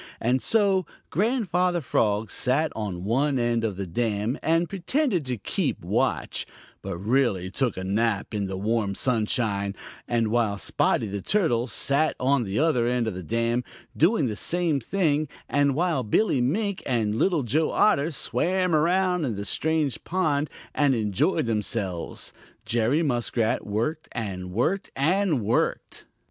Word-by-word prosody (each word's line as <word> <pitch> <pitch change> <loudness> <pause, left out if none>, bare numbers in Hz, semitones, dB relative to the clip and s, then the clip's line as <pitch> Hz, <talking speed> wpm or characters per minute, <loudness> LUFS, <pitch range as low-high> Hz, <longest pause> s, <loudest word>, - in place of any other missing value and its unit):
And 125 +3 +1
so, 205 -4 +3
while 185 -4 -3 0.2
Grandfather 180 - +1
Frog 110 -7 0
sat 140 +5 +1
on 100 -5 -4
one 135 +6 +1
end 120 -1 +1
of 105 -4 -2
the 100 - -3
dam 110 - -1
and 165 +2 +2
pretended 195 - -1
to 125 -1 -1
keep - - -2
watch, - - -1 0.3
but - - -5
really 100 -3 +1
took 125 -2 -1
a 95 - -4
nap 105 +2 0
in 100 -2 -1
the 95 0 -4
warm 105 0 0
sunshine, 105 -4 0 0.3
and 115 -2 +1
while 110 -3 +1
Spotty 100 - +1
the 100 -1 -4
Turtle 125 - +1
sat 145 +4 +1
on 130 -1 +2
the 100 +1 -3
other 140 -7 +2
end 125 -1 +1
of 110 - -2
the 90 - -6
dam 115 +6 0 0.3
doing 165 -1 +3
the 110 -4 -2
same 170 +2 +1
thing, 155 - 0 0.2
and 145 -1 +2
while 170 -3 +1
Billy 130 - +2
Mink 200 - 0
and 115 -5 +1
Little 155 - +1
Joe 150 +7 +1
Otter 150 -7 +3
swam 175 +5 0
around 180 +3 +2
in 120 -7 -1
the 100 +1 -4
strange 155 -1 -1
pond 155 -5 0 0.2
and 140 -3 +3
enjoyed 110 - +1
themselves, 105 -5 -2 0.3
Jerry 120 +8 +1
Muskrat 120 -5 0
worked 115 +10 -2
and 95 -6 -4
worked 125 - 0
and 165 0 +2
worked. 110 +3 -1
125 Hz, 155 wpm, -25 LUFS, 110-160 Hz, 0.3 s, so